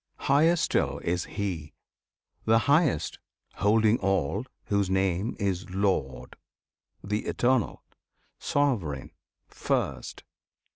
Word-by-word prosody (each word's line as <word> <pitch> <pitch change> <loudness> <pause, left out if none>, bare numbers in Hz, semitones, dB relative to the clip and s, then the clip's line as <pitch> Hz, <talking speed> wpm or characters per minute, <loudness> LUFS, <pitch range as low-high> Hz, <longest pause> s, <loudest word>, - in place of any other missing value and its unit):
Higher 160 +5 +4
still 165 - 0
is 90 +1 -1
He, 85 -8 -4 0.7
The 115 0 +5
Highest, 145 - +2 0.4
holding 110 +2 +3
all, 95 - 0 0.2
whose 100 -2 +1
Name 95 +2 0
is 95 -2 -2
LORD, 95 -10 -1 0.7
The 105 +2 -2
Eternal, 125 -2 +1 0.6
Sovereign, 105 - -1 0.4
First! - - -3
100 Hz, 90 wpm, -27 LUFS, 90-120 Hz, 0.7 s, The